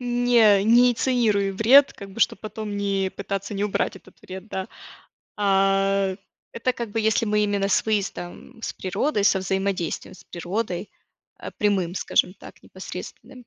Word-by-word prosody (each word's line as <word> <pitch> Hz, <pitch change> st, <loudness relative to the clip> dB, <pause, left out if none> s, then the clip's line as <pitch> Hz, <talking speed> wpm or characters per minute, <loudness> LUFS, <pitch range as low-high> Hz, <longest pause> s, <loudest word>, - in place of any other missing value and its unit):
не 240 Hz, -4 st, +4 dB
не 240 Hz, +3 st, +6 dB
инициируй 225 Hz, -5 st, +1 dB
вред, 250 Hz, +8 st, +5 dB
как 200 Hz, 0 st, -11 dB
бы, 200 Hz, -, -9 dB
чтоб -, -, +2 dB
потом 215 Hz, -1 st, -6 dB
не 195 Hz, -1 st, -1 dB
пытаться 200 Hz, +1 st, -4 dB
не 200 Hz, -, -2 dB
убрать 205 Hz, -1 st, -1 dB
этот 185 Hz, 0 st, -18 dB
вред, 190 Hz, +2 st, -9 dB
да, 190 Hz, -2 st, -5 dB, 0.7 s
а. 195 Hz, -1 st, +2 dB, 0.4 s
Это 250 Hz, +2 st, -1 dB
как 235 Hz, -3 st, -5 dB
бы 225 Hz, -, -1 dB
если 220 Hz, +1 st, +2 dB
мы 210 Hz, -1 st, +1 dB
именно 200 Hz, -1 st, 0 dB
с 200 Hz, -, +1 dB
выездом, 205 Hz, 0 st, -4 dB
с -, -, -5 dB
природой, 205 Hz, +4 st, -1 dB
со 200 Hz, -, +4 dB
взаимодействием 190 Hz, -2 st, -2 dB
с -, -, -16 dB
природой, 180 Hz, +2 st, -4 dB, 0.5 s
а, -, -, -7 dB
прямым, 190 Hz, -4 st, 0 dB
скажем 185 Hz, -1 st, +1 dB
так, -, -, -15 dB
непосредственным. 225 Hz, +7 st, -10 dB
200 Hz, 155 wpm, -24 LUFS, 195-225 Hz, 0.7 s, не